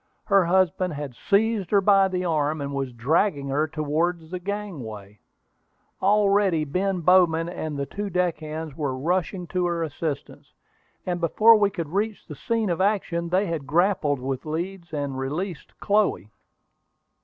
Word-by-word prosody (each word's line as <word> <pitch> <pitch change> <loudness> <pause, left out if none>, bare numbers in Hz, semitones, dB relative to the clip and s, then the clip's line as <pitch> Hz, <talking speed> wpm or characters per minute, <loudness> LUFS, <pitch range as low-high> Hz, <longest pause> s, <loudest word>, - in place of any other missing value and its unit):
Her 195 -3 +4
husband 180 -1 +1
had 145 -3 -5
seized 205 - +1
her 205 - +4
by 195 0 +5
the 185 -1 -2
arm, 155 -2 0
and 140 0 -4
was 135 -2 -2
dragging 140 - 0
her 150 +3 +1
towards 160 +2 -2
the 180 - -3
gangway. 135 - -6 0.8
Already 200 -4 +3
Ben 185 +4 -1
Bowman 170 -2 +4
and 155 -4 -5
the 140 - -2
two 205 +7 -5
deck 180 -3 0
hands 155 -1 -6
were 140 -4 -2
rushing 180 +4 -1
to 180 -1 0
her 170 -1 -1
assistance, 150 -1 -5 0.5
and 175 -1 -2
before 220 +7 +6
we 205 -2 +3
could 170 -6 -5
reach 205 +4 -2
the 150 - -8
scene 220 - -1
of 170 - -1
action 180 -4 0
they 185 +4 +2
had 160 -6 -4
grappled 165 -2 +2
with 130 0 -3
Leeds, 170 +3 -5
and 140 -3 -3
released 150 +5 -5
Chloe. 200 - +1
170 Hz, 155 wpm, -24 LUFS, 150-195 Hz, 0.8 s, before